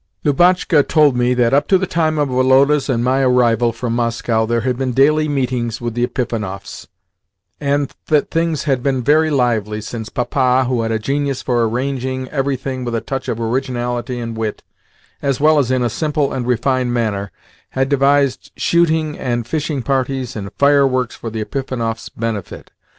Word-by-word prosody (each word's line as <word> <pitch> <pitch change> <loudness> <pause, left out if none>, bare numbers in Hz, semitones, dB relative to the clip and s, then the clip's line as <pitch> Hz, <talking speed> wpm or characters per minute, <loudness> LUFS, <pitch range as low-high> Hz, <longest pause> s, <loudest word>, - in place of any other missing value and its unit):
Lubotshka 175 +1 +4
told 150 -4 +4
me 125 +1 +2
that, 120 -1 +2
up 145 +1 +3
to 190 - +5
the 190 - -1
time 160 -3 0
of 145 -1 +1
Woloda's 135 +3 +3
and 120 -3 +1
my 130 +2 +2
arrival 120 -2 +3
from 115 +1 -4
Moscow, 115 -1 0
there 115 0 0
had 125 +1 0
been 130 0 -2
daily 155 +4 +3
meetings 125 -4 -1
with 120 -1 -4
the 120 +1 -1
Epifanovs, 105 -7 -5 0.7
and 140 -1 -1
that 150 -2 +1
things 165 -2 0
had 135 -4 0
been 130 -1 0
very 155 +4 +3
lively, 115 -6 0
since 110 +1 -6
Papa, 130 +1 +1
who 125 -2 0
had 115 0 -2
a 110 - +1
genius 140 +3 -2
for 120 -2 +1
arranging, 130 +1 -3
everything 135 -2 -2
with 120 -1 -3
a - - +1
touch 135 -1 -5
of 115 - -2
originality 120 0 -2
and 115 -1 -5
wit, 110 -1 -4 0.6
as 140 -3 0
well 155 +1 +4
as 130 -4 0
in 130 -1 +1
a - - +2
simple 150 +2 -1
and 125 -2 -3
refined 125 +1 +1
manner, 105 -5 -1 0.4
had 135 0 0
devised 140 -1 +1
shooting 160 -3 +1
and 120 -2 -2
fishing 150 0 -2
parties 130 -2 -1
and 100 -2 -6
fireworks 135 -4 +2
for 115 - -6
the 110 0 -4
Epifanovs' 115 -3 -4
benefit. 110 -4 -5
130 Hz, 175 wpm, -18 LUFS, 120-140 Hz, 0.7 s, to